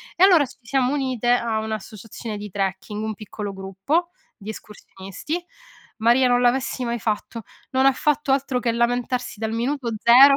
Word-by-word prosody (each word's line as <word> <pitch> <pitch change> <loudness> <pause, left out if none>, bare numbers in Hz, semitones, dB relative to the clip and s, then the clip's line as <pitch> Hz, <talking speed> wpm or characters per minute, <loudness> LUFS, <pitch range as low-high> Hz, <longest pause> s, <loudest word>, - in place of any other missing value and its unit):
E 355 - +4
allora 355 -6 +7
ci 260 - -15
siamo 260 +2 +1
unite 260 -4 -1
a 235 -2 +2
un'associazione 220 0 -6
di 205 0 -7
trekking, 195 +2 -3
un 220 0 -2
piccolo 210 -1 -6
gruppo, 195 - -1 0.3
di 215 -1 -10
escursionisti. 210 - -7 0.5
Maria! 240 +3 +4
Non 245 0 +3
l'avessi 255 +1 +1
mai 235 -1 -2
fatto: 220 +1 -3 0.3
non 265 0 +3
ha 270 - +7
fatto 295 0 +1
altro 270 -2 +1
che 240 -1 0
lamentarsi 245 0 -1
dal 220 0 -2
minuto 245 +2 -1
0, 265 +4 +9
235 Hz, 160 wpm, -23 LUFS, 215-265 Hz, 0.5 s, 0